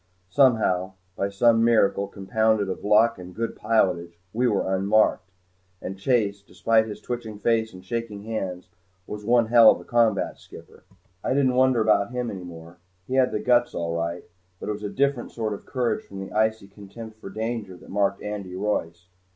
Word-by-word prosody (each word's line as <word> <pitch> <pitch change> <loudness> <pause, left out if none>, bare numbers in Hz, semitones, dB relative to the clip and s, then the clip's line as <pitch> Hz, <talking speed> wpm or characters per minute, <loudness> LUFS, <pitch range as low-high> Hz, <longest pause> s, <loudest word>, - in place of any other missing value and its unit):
Somehow, 110 -9 +3 0.2
by 100 - -1
some 115 +3 +3
miracle 105 -4 +3
compounded 110 +1 0
of 95 - -5
luck 105 +1 +4
and 90 0 -10
good 115 +1 -3
pilotage, 90 -6 0 0.2
we 125 +3 +1
were 100 -3 +1
unmarked. 100 -1 +2 0.5
And 95 - -6
Chase, 100 -1 0
despite 110 +2 +1
his 105 - -7
twitching 115 -3 -5
face 110 +1 +1
and 95 -2 -13
shaking 110 -1 -4
hands, 95 -5 -4 0.4
was 105 0 -7
one 120 +2 +3
hell 115 0 +7
of - - +3
a - - -11
combat 115 -4 +1
skipper! - - -15 0.4
I - - 0
didn't 135 -2 +3
wonder 130 -2 +3
about 105 -2 +3
him 125 -1 -3
any 95 -2 -7
more. 85 0 -11 0.3
He 130 - -6
had 130 -1 +3
the - - -1
guts 120 0 +2
all 85 -1 -2
right. 85 +1 -3 0.4
But - - -6
it - - 0
was 105 - -8
a 105 - -3
different 140 -1 -1
sort 110 -2 -2
of 100 - -10
courage 125 -3 -1
from 100 - -10
the 95 - -7
icy 110 -1 0
contempt 105 +3 -11
for 105 - -9
danger 110 -2 -4
that - - -16
marked 100 0 0
Andy 100 -3 -5
Royce. 90 -4 -2
105 Hz, 185 wpm, -25 LUFS, 95-115 Hz, 0.5 s, hell